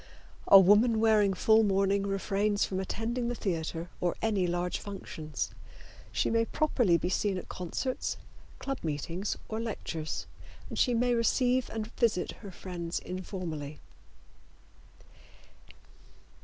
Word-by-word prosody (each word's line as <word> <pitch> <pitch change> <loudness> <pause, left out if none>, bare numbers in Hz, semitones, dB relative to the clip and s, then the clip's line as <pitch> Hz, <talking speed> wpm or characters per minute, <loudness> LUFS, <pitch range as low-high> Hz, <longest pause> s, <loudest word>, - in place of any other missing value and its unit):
A 195 - +10
woman 210 +4 +5
wearing 215 -3 +4
full 220 +3 +5
mourning 195 -1 +2
refrains 200 +1 +1
from 190 - -3
attending 230 +5 -2
the 240 - -1
theater 165 -3 -3
or 175 -1 +1
any 205 -5 +1
large 175 +1 -1
functions. 165 -6 -5 0.6
She - - 0
may 230 0 +3
properly 240 - +2
be 175 - -2
seen 190 +1 0
at - - -7
concerts, 185 +9 -3 0.4
club 275 -1 -4
meetings 165 +5 -3
or 220 - -3
lectures, 170 -8 -4 0.4
and - - -4
she 245 -2 +3
may 245 +1 +2
receive 245 +2 +2
and 220 -1 -3
visit 215 -7 +1
her 205 - -8
friends 175 -2 -5
informally. 170 -6 -5
200 Hz, 125 wpm, -30 LUFS, 180-225 Hz, 0.6 s, A